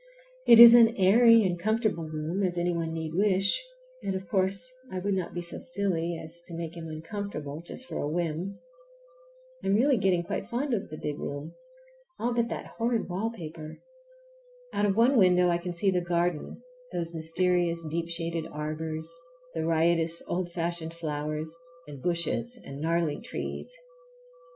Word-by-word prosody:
It 235 - +9
is 235 0 +12
as 235 -1 +9
airy 230 +4 +6
and 175 -2 0
comfortable 215 -3 0
a - - -8
room 155 +5 -3
as 180 -2 0
any 175 0 +1
one 165 -1 -2
need 160 -1 -4
wish, 195 - +2 0.4
and, 195 - -2
of 190 -1 -5
course, 195 +7 +1 0.2
I 185 - -4
would 200 +2 -1
not 185 -2 -3
be 175 - -3
so 170 - -5
silly 175 -8 -1
as 160 +2 -7
to 170 - -7
make 165 0 -5
him 165 -1 -7
uncomfortable 160 -2 -6
just 210 +9 -8
for - - -5
a 145 - -2
whim. 170 +3 -2 1.1
I'm 195 - +2
really 260 +4 +4
getting 185 -4 +2
quite 195 +2 -4
fond 250 +3 -2
of 205 - -2
the 155 - -7
big 150 -1 -4
room, 145 +3 -5 0.6
all 240 +1 -1
but 235 -1 +1
that - - -6
horrid 230 0 0 0.3
paper. 160 -3 -8 1.0
Out 205 - +2
of 195 - +1
one 240 +3 +5
window 180 -2 +5
I 170 0 +1
can 175 +1 -4
see 190 +3 +2
the 180 -1 +1
garden, 175 +4 -1 0.3
those 170 -1 -3
mysterious 170 +1 +1
deep 165 +2 -3
shaded 165 -1 -2
arbors, 155 +1 -4 0.5
the 160 0 -2
riotous 165 0 +2
old 175 0 -2
fashioned 170 -1 -2
flowers, 155 0 -4 0.3
and 140 -3 -9
bushes 175 - -1
and 140 +1 -8
gnarly 165 -2 0
trees. - - -5
175 Hz, 170 wpm, -28 LUFS, 160-195 Hz, 1.1 s, is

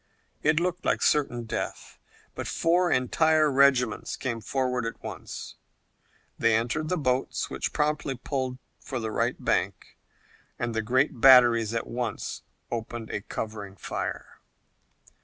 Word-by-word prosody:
It 155 +1 +3
looked 180 +1 -2
like - - +1
certain 135 -5 +2
death, 110 - -5 0.3
but - - -5
four 175 +2 +2
entire 155 +4 +3
regiments 135 -2 +3
came 115 -3 -3
forward 125 0 -1
at 115 - -5
once. - - -7 0.8
They 115 -1 +4
entered 120 +8 -1
the 180 - +1
boats, 130 -3 -1
which - - -2
promptly 150 -2 0
pulled 130 0 -3 0.2
for 130 - -5
the 110 -1 -3
right - - 0
bank, - - -2 0.6
and 120 -1 -2
the 110 - 0
great 130 +2 +1
batteries 120 -4 +7
at 115 - -1
once 120 -1 -4 0.3
opened 115 -1 -5
a 105 - -3
covering 105 -2 -6
fire. - - -5
125 Hz, 135 wpm, -27 LUFS, 115-145 Hz, 0.8 s, batteries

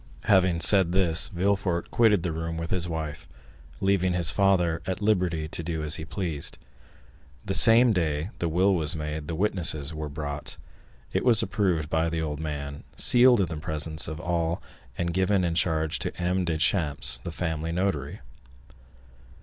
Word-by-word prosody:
Having 95 -5 +2
said 90 0 +6
this, 90 -3 +2
Villefort 95 -1 -1
quitted 105 -6 +3
the 90 - -2
room 80 +1 -5
with 85 0 -6
his 85 -2 0
wife, 80 -3 -6 0.5
leaving 95 -2 +1
his 85 -2 +3
father 90 -4 +1
at 95 0 -3
liberty 90 -7 0
to 85 - -3
do 80 -1 -4
as 75 +1 +2
he 80 - -7
pleased. 80 -4 -2 0.9
The 95 - -2
same 115 +4 +6
day 80 0 -2
the 85 - -1
will 95 +5 +2
was 80 -2 +1
made, 75 -1 -5
the 80 - -4
witnesses 80 -6 0
were 75 -1 -6
brought, 75 0 -5 0.6
it - - 0
was 120 -4 +4
approved 90 -7 -1
by 80 +1 +1
the 80 0 -3
old 75 -2 -4
man, 70 -2 -6
sealed 120 -2 +5
in 95 - 0
the 80 - -5
presence 80 0 0
of 80 -1 -6
all 85 +1 -2 0.4
and 85 0 -2
given 95 +1 +1
in 85 -1 -1
charge 80 -2 0
to - - -5
M. 90 +1 -1
Deschamps, 80 -6 +1
the 70 - -7
family 80 -1 -4
notary. 85 -6 -3
85 Hz, 165 wpm, -25 LUFS, 80-95 Hz, 0.9 s, said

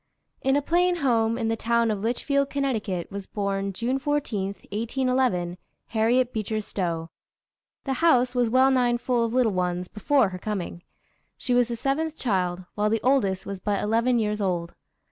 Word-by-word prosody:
] - - -51
In 270 +1 +2
a 290 - +1
plain 355 +3 +2
home, 230 -7 +1
in 230 -2 -1
the 225 - +1
town 235 0 +1
of 210 - -2
Litchfield, 280 +5 0
Conn., 220 -11 -1
was 200 -1 -6
born, 200 -1 -2
June 240 +7 -1
14, 270 -9 -1 0.3
1811, 230 -5 0 0.3
Harriet 240 +3 +2
Beecher 215 0 -2
Stowe. 170 -5 -3 0.7
The 270 - -1
house 255 -7 +4
was 245 -2 +2
well 260 +3 +5
nigh 245 -2 +3
full 240 -1 0
of 230 - -3
little 250 -4 +3
ones 180 0 -1
before 230 +2 +2
her 185 -1 -7
coming. 185 -4 -4 0.6
She 250 - -1
was 245 -1 +4
the 240 - -3
seventh 295 +6 -1
child, 185 -5 -1
while 210 0 +1
the 225 +1 +1
oldest 240 -8 +2
was 195 -1 -5
but 200 0 -1
eleven 230 +4 +2
years 210 -1 0
old. 175 -3 -1
225 Hz, 175 wpm, -25 LUFS, 195-255 Hz, 0.7 s, well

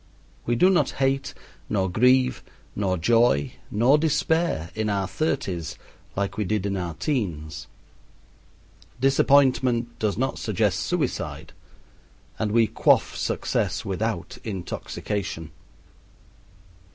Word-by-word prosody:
We 120 - +2
do 185 +10 +5
not 180 - +2
hate, 135 0 0 0.3
nor 95 -3 +1
grieve, 125 +7 +3 0.3
nor 95 -2 0
joy, 85 - +3 0.2
nor 125 +8 +4
despair 160 - 0
in 110 0 -1
our 100 -2 0
thirties 95 - -2 0.4
like 100 0 -2
we 105 - +1
did 105 0 -1
in 100 -1 -1
our 90 -4 -3
teens. 80 - -3 1.3
Disappointment 130 -3 +3
does 105 -2 0
not 130 +2 -1
suggest - - 0
suicide, - - -2 0.9
and 105 -2 0
we 115 +1 +4
quaff - - +2
success - - -1
without - - -3
intoxication. 95 -3 -4
110 Hz, 105 wpm, -25 LUFS, 95-130 Hz, 1.3 s, do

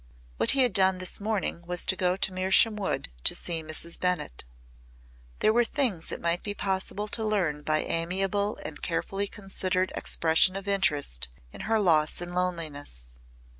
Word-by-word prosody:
What - - +2
he 265 - +6
had 245 -5 +1
done 190 -1 +4
this 185 +2 -3
morning 205 -5 -2
was 175 0 +1
to - - +2
go 180 -1 +1
to 195 - +2
Mersham 190 +4 +4
Wood 200 - -3
to - - +4
see 165 -2 -3
Mrs. 155 +2 0
Bennett. 180 - -1 1.0
There 215 - +4
were 240 +1 +4
things 230 - 0
it - - -5
might 170 +1 0
be 205 -1 -5
possible 195 +2 -1
to 220 - +1
learn 185 -9 0
by 155 +1 0
amiable 195 +5 -1
and - - -7
carefully 200 +1 -2
considered 190 -2 -2
expression 165 +3 +3
of 195 0 -6
interest 145 - +1 0.3
in - - -9
her 225 -1 +3
loss 160 -6 +2
and 175 0 -5
loneliness. 155 - -3
185 Hz, 170 wpm, -27 LUFS, 165-200 Hz, 1.0 s, he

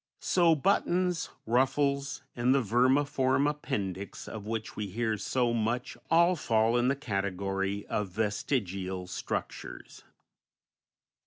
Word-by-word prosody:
So 170 -3 +4
buttons, 180 +1 +1 0.2
ruffles, 135 +3 +1
and 125 +2 +3
the 135 - +3
vermiform 130 +4 +2
appendix 100 -10 -3
of 105 -2 -7
which 110 0 -4
we 105 - -3
hear 110 +3 -1
so 120 0 +1
much 120 +3 -1
all 170 +2 +5
fall 115 -5 +2
in 120 0 +3
the 135 - +2
category 100 -4 -2
of 105 - -2
vestigial 95 -2 -2
structures. - - -5
120 Hz, 110 wpm, -30 LUFS, 100-140 Hz, 0.2 s, all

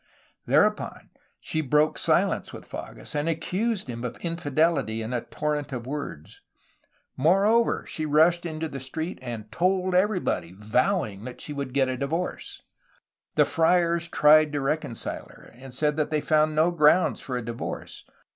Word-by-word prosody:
Thereupon - - +1 0.3
she 160 - -2
broke 150 +2 +2
silence - - +1
with - - -10
Fages, - - -8
and 150 +2 0
accused 195 +5 -1
him 120 -1 -6
of 125 - -4
infidelity 150 -8 0
in 115 +3 -4
a 120 - 0
torrent 150 +1 -3
of 120 -3 -5
words. 125 - -7 0.7
More 180 +9 +3
over, 230 +2 +2
she 155 -1 -3
rushed 160 +4 +4
into 160 -1 -3
the 140 -3 -6
street 160 +6 -5
and 110 -3 -7
^Hold 185 +1 +1
everybody,^' 180 - 0
vowing 110 - 0
that 125 - -8
she 150 - -5
would 140 -2 -4
get 135 -1 +3
a 130 0 -2
divorce. 160 +7 -4 0.7
The - - +5
friars 170 0 +2
tried 155 -1 +5
to 145 - -1
reconcile 135 -4 -3
her, - - -16
and 130 +2 -12
said 150 +4 0
that 155 - 0
they 155 - +1
found 155 +1 +2
no 160 +3 +3
grounds 170 +2 +3
for 125 -2 -4
a 120 - -5
divorce. 115 0 -6
150 Hz, 160 wpm, -26 LUFS, 130-170 Hz, 0.7 s, The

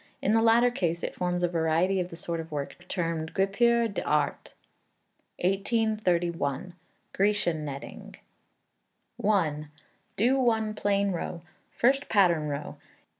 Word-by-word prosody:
In 210 - +1
the 225 - +4
latter 230 +2 +5
case 170 -6 -2
it - - -3
forms 180 0 -2
a - - +4
variety 170 +3 +1
of 180 -1 -2
the 165 - -9
sort 170 0 -4
of 165 0 -7
work 150 +4 -6
termed 165 -3 -3
guipure 235 +5 +3
d'Art. 150 -8 -1 0.8
1831. 180 - 0 0.4
Grecian 190 -6 +1
Netting. 140 -2 -8 1.1
i. 160 -8 +1 0.5
Do 250 +6 +3
one 220 -4 +1
plain 200 -1 +1
row. 170 -1 -4 0.3
First 270 +3 +2
pattern 175 -7 +3
row. 145 0 -5
180 Hz, 125 wpm, -28 LUFS, 165-215 Hz, 1.1 s, latter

